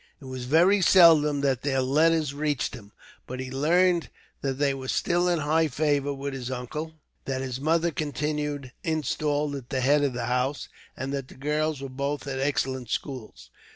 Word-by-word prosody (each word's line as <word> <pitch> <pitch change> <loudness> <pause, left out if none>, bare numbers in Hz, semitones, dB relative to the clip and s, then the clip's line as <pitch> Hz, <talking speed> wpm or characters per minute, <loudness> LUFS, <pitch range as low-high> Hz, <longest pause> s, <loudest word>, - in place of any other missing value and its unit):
It 145 - -13
was 130 -1 -6
very 175 +9 +4
seldom 155 -6 +6
that 135 -3 +1
their 135 -2 0
letters 155 +2 +2
reached 145 -2 -1
him; 105 -6 -11 0.4
but 130 +1 -6
he 130 0 -5
learned 170 +5 +2 0.3
that 135 -1 -1
they 140 -1 +2
were 130 -1 -6
still 175 +6 +1
in 175 - +2
high 155 +2 +2
favour 145 0 0
with 140 0 -4
his 130 -2 -5
uncle, 140 +6 -5 0.3
that 130 -1 -2
his 130 -1 -4
mother 165 +3 +2
continued 150 -2 -3
installed 150 -1 -1
at 130 -3 -8
the 130 -2 -1
head 145 +3 +3
of 140 -3 +1
the 120 -1 -3
house, 125 +3 -1 0.3
and 135 +2 -4
that 135 -2 -3
the - - -14
girls 150 +1 -1
were - - -3
both 140 +2 -3
at 135 -1 -3
excellent 130 -3 -1
schools. 110 - -5
140 Hz, 185 wpm, -26 LUFS, 130-155 Hz, 0.4 s, seldom